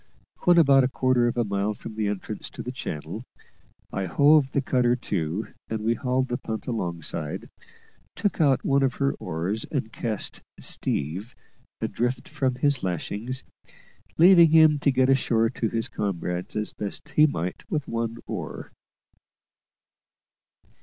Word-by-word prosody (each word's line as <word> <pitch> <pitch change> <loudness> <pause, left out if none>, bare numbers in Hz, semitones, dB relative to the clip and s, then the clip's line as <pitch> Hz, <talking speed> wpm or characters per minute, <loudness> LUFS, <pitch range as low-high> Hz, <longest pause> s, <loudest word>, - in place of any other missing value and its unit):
When 175 -2 +6
about 140 -5 +6
a - - +3
quarter 130 -2 +2
of 120 - -2
a 120 - +3
mile 100 0 -1
from 110 - -9
the 110 -1 -1
entrance 105 +1 -4
to - - -8
the 125 - -4
channel, 80 - -6 0.7
I 95 - -1
hove 140 - +4
the - - +1
cutter 125 -2 +2
to, 100 -4 -3 0.2
and 110 -1 -2
we 115 +2 +2
hauled 130 +1 0
the 120 - -2
punt 110 -1 -5
alongside, 85 - -4 0.7
took 200 -2 0
out 135 -4 +3
one 140 0 +3
of 130 -2 +1
her 140 0 +1
oars, 90 +8 -2
and 125 -7 -3
cast 110 -4 -3 0.2
"Steve" 90 - -3 0.5
adrift 125 +1 -1
from 135 -4 -1
his 140 +1 +2
lashings, 105 +8 -3 0.7
leaving 170 -1 +8
him 155 -2 +6
to 140 - +3
get 130 0 +3
ashore 115 -4 +2
to 115 -3 -1
his 115 0 -1
comrades 90 -2 -3
as 105 0 -1
best 105 +8 -5
he 150 +2 +5
might 90 - -4
with 150 -3 -2
one 115 0 -2
oar. - - -6
120 Hz, 150 wpm, -25 LUFS, 105-135 Hz, 0.7 s, leaving